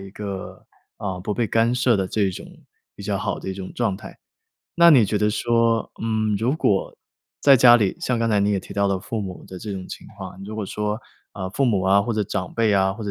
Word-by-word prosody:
一 95 0 -10
个 100 -2 -7 0.3
啊， 95 -3 -4
不 100 +3 -3
被 120 -2 0
干 115 +3 +2
涉 125 -3 +3
的 95 -1 -1
这 100 -1 0
种 - - -8 0.5
比 100 - -11
较 100 -1 -2
好 - - -2
的 - - -7
一 95 - -3
种 95 -1 -7
状 95 - 0
态。 - - -12 0.6
那 170 0 +7
你 120 -8 +6
觉 105 - -1
得 105 +1 +2
说， 115 0 +1
嗯， 110 -2 0
如 120 +7 0
果 100 -11 0 0.5
在 140 -2 +7
家 120 0 +8
里 105 -5 0
像 125 -2 -1
刚 115 0 +1
才 105 -2 +2
你 100 - +2
也 100 -2 0
提 100 - -11
到 100 0 +2
了 95 -1 0
父 110 +3 -4
母 95 -2 -7
的 95 - -9
这 105 +2 -6
种 95 -1 -6
情 - - -9
况， - - -8
如 110 +1 -7
果 105 -3 -4
说 105 +2 -3 0.3
啊， 95 -2 -5
父 135 +8 0
母 105 -7 +2
啊， 100 +1 +4
或 115 +2 -2
者 110 - 0
长 95 -2 -4
辈 110 -3 +2
啊， 95 0 +2
或 110 +2 -8
者 100 - -3
105 Hz, 265 characters per minute, -23 LUFS, 95-115 Hz, 0.6 s, 家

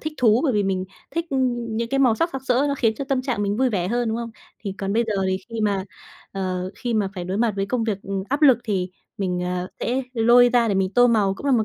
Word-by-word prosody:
thích 310 - -4
thú 230 -1 +4
bởi 275 - +2
vì 210 -2 +2
mình 190 -1 -1 0.3
thích 335 0 -2
những 240 -4 -1
cái 275 - +1
màu 250 -4 +4
sắc 330 +9 0
sặc 270 - -5
sỡ 255 +2 +3
nó 280 - 0
khiến 225 -5 +1
cho 275 - -4
tâm 265 -2 +1
trạng 255 -6 -1
mình 205 0 0
vui 260 +1 +2
vẻ 185 -4 -1
hơn, 240 +2 0
đúng 220 - -1
không? 235 -1 -5 0.3
Thì 200 - -2
còn 195 0 -2
bây 230 +2 +2
giờ 220 - -1 0.2
thì 185 - +1
khi 230 -1 -4
mà, 200 -3 0 0.5
ờ, 185 -1 -3
khi 240 -2 -3
mà 210 -3 +1
phải 180 -2 -5
đối 185 +3 -2
mặt 230 -1 +2
với 195 0 -1
công 235 +1 -1
việc, 205 -3 -2
ừm, 195 -1 -3
áp 280 +3 -1
lực 265 -6 +7
thì 185 -4 -1 0.3
mình, 180 -3 -1
ờ, 180 0 -3
sẽ 255 +3 0
lôi 240 +1 +6
ra 240 -2 +3
để 205 - +1
mình 190 -1 +1
tô 245 0 +6
màu, 210 -5 +2
cũng 240 - -7
là 280 - +3
một 230 -3 +3
225 Hz, 285 wpm, -23 LUFS, 195-245 Hz, 0.5 s, lực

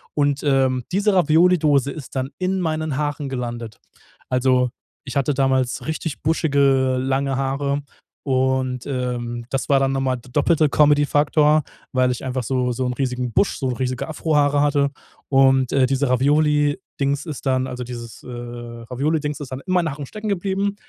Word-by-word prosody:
Und, 145 -1 +1
ähm, 130 -3 +2
diese 205 +3 +2
Ravioli-Dose 155 -4 +4
ist 140 -2 -9
dann 130 +1 -1
in 185 0 0
meinen 155 -4 -1
Haaren 145 -1 -2
gelandet. 120 -3 -5 0.5
Also, 125 0 +2 0.4
ich 130 +1 -4
hatte 140 +1 +1
damals 130 0 0
richtig 160 -1 -4
buschige, 140 -4 +2
lange 135 +1 0
Haare 140 +1 -1 0.4
und, 130 -2 0
ähm, 120 -3 -3
das 135 +1 -2
war 135 -1 +5
dann 135 0 +1
noch 135 - 0
mal 130 -1 0
der 125 +1 -15
doppelte 155 +1 +3
Comedy-Faktor, 150 +1 +3 0.3
weil 130 0 +3
ich 125 - -5
einfach 130 -1 -2
so 125 +1 0
so 130 +2 -2
'n 125 - -1
riesigen 125 -3 -2
Busch, 200 - +2
so 130 -2 -1
riesige 125 +2 -2
Afro-Haare 145 -2 +1
hatte. 145 -1 +2 0.4
Und, 135 -2 +4
äh, 130 -2 +4
diese 135 +1 0
Ravioli 145 +2 +2 0.2
Dings 140 +3 0
ist 150 -3 -7
dann 130 0 +2
also, 125 0 -5
dieses, 120 -2 -8
äh, - - -12
Ravioli-Dings 120 +6 -4
ist 140 -3 -8
dann 130 +1 -5
in 185 - -1
meinen 175 -3 +2
Haaren 140 0 -6
stecken 215 0 -6
geblieben. 200 +1 -1
135 Hz, 165 wpm, -21 LUFS, 130-150 Hz, 0.5 s, war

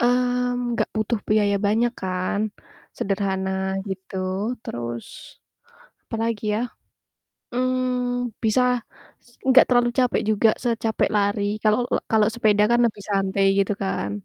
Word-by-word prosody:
Mmm, 245 0 +1
gak - - +1
butuh 220 +1 0
biaya 205 -1 +3
banyak 230 +3 +2
kan, 185 +2 -1 0.6
sederhana, 190 -1 -1 0.4
gitu. 190 0 -6 0.5
Terus, 120 - -5 1.0
apalagi 225 -1 -3
ya? 215 - 0 0.9
Mmm, 250 -2 -1
bisa 220 +3 +3 0.6
s - - -21 0.3
gak - - +10
terlalu 245 -1 +3
capek 250 -1 +3
juga, 215 +1 +4
secapek 230 -3 0
lari, 205 0 +1 0.2
kalo 215 -1 +4 0.2
lok - - 0
kalo 220 -1 +5
sepeda 215 -3 +3
kan 240 0 +4
lebih 215 -3 -1
santai, 195 0 +1
gitu 200 +1 +2
kan. 190 - -2
220 Hz, 120 wpm, -23 LUFS, 200-245 Hz, 1.0 s, gak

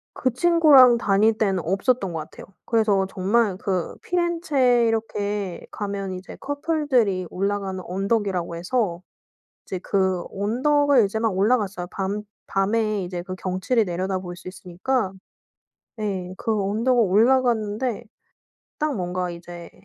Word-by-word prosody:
그 255 -3 0
친구랑 285 -5 +6
다닐 215 0 +2
때는 195 -4 +1
없었던 195 +2 0
것 160 - -3
같아요. 155 - -10 0.2
그래서 215 -4 +2
정말 195 +1 +1
그 185 -4 -2
피렌체에 310 -9 +2
이렇게 205 -4 -2
가면 200 -2 -4
이제 185 +1 -8
커플들이 280 - 0
올라가는 195 -1 -2
언덕이라고 195 -2 -1
해서 180 0 -1 0.6
이제 185 - -4
그 190 -1 0
언덕을 260 +6 +2
이제 205 +2 -2
막 220 -4 0
올라갔어요. 200 -4 +1
밤 200 +2 -3 0.2
밤에 210 0 0
이제 175 -1 -5
그 185 0 -6
경치를 185 +6 0
내려다볼 185 0 -3
수 185 - -10
있으니까 190 +4 -2 0.9
네. 190 -4 -3
그 220 -3 -1
언덕을 230 +5 +1
올라갔는데 230 +1 +2 0.7
딱 300 -2 -1
뭔가 180 -1 -2
이제 170 0 -10
205 Hz, 285 characters per minute, -23 LUFS, 185-240 Hz, 0.9 s, 친구랑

